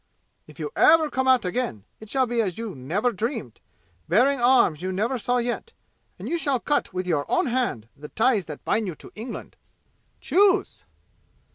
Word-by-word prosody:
If - - -15
you 435 - -4
ever 315 -1 +5
come 260 0 -1
out 255 -5 +4
again, 180 - -2 0.2
it 220 - -12
shall 265 +1 +2
be 240 -1 0
as 190 -5 -2
you 225 -3 -5
never 170 - -1
dreamed, 220 - -4 0.5
bearing 250 - +3
arms 240 - +4
you 185 +1 -2
never 225 +7 -1
saw 245 +3 0
yet, 245 - -3 0.4
and - - -8
you 340 - -1
shall 275 -5 0
cut 290 +4 -1
with 185 0 -3
your 155 -5 -1
own - - +2
hand 240 - -1
the 150 +1 -11
ties 225 -4 +2
that 150 -2 -9
bind 220 -2 0
you 175 - -5
to - - -14
England! 230 +3 -8 0.6
Choose!" 390 0 +2
230 Hz, 180 wpm, -24 LUFS, 185-260 Hz, 0.6 s, ever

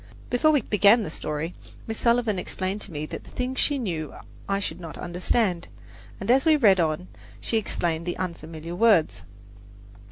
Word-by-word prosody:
Before 250 +5 +4
we 295 -3 +4
began 210 +3 +5
the 155 - -5
story 155 +2 -4 0.3
Miss 220 0 -4
Sullivan 235 -4 +2
explained 190 +3 -3
to 200 - -7
me 150 -1 -4
the - - -6
things 250 +1 -4
that - - -1
she 290 - +2
knew 170 - -3 0.3
I 195 0 +1
should 200 - -4
not 165 -3 -8
understand, 180 +1 0 0.5
and - - 0
as 265 +2 +5
we 320 -1 +5
read 205 -10 +5
on 160 +2 0 0.3
she 225 - -1
explained 170 -5 -1
the 175 - -2
unfamiliar 170 -2 -6
words. 205 -5 +3
190 Hz, 170 wpm, -25 LUFS, 170-230 Hz, 0.5 s, began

